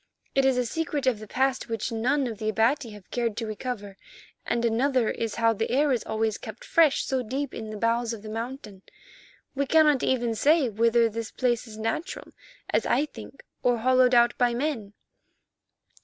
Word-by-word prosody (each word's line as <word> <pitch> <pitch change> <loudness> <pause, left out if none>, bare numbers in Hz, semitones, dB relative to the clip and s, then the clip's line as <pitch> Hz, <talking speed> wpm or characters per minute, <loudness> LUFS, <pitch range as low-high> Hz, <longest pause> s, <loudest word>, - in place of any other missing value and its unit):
It 270 0 +3
is 265 -1 +3
a 250 - +1
secret 295 +1 -2
of 250 -5 +2
the 215 - -9
past 260 +2 0
which 225 +1 -2
none 255 +5 +1
of 225 -4 -5
the 215 - -1
Abati 230 +4 +1
have 210 -3 -13
cared 230 -3 -1
to 230 - -2
recover, 215 -3 -5 0.5
and 235 0 0
another 245 +1 +2
is 225 -2 -3
how 230 -1 +3
the 225 +1 -2
air 285 +3 +2
is 245 -4 0
always 220 -1 -1
kept 220 0 -9
fresh 320 -4 +3
so 265 -1 0
deep 265 +4 -4
in 220 -1 -6
the 215 - -6
bowels 230 +2 0
of 220 -3 -7
the - - -8
mountain. 225 -3 -6 0.7
We 280 0 -1
cannot 300 -3 +4
even 240 -3 +1
say 290 +4 +3
whether 230 +2 +3
this 225 0 -5
place 240 -1 -1
is 215 -1 -10
natural, 225 - -4 0.4
as - - +1
I 290 - +2
think, 285 - -12 0.2
or 245 -1 +2
hollowed 255 +1 +4
out 240 0 +5
by 245 -1 +2
men." 240 -7 -3
235 Hz, 190 wpm, -26 LUFS, 225-265 Hz, 0.7 s, out